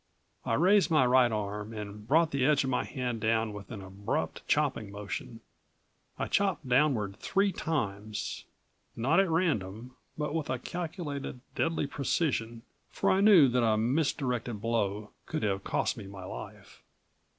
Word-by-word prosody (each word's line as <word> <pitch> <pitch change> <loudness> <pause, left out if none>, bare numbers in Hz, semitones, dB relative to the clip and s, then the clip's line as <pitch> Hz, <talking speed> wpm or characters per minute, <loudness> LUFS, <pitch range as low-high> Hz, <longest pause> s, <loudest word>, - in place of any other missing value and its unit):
I 115 - +1
raised 190 - +4
my 155 -6 +4
right 125 -1 +5
arm 105 0 -3
and 105 0 -7
brought 160 +4 +4
the 140 -2 0
edge 145 +1 +4
of 130 - -1
my 125 - +1
hand 125 -3 -3
down 110 0 +1
with 105 -1 -9
an 105 -5 -7
abrupt, 95 +2 -3
chopping 105 - +1
motion. 105 +4 -6 0.8
I - - -1
chopped 195 -8 0
downward 125 -7 +2
three 200 0 +1
times, 110 - -3 0.5
not 135 +10 +2
at 195 -2 +3
random, 125 - -1 0.2
but 150 -1 -2
with 160 -2 -2
a 130 - 0
calculated, 150 -3 -5
deadly 165 -2 0
precision, 130 -5 -1 0.3
for - - +1
I 190 - +3
knew 195 -9 +8
that 125 +1 +2
a 110 -1 +3
misdirected 125 -2 0
blow 105 -2 -1 0.2
could 155 - -3
have 100 -2 0
cost - - 0
me 100 - -8
my 95 -1 -9
life. - - -9
125 Hz, 155 wpm, -30 LUFS, 105-155 Hz, 0.8 s, knew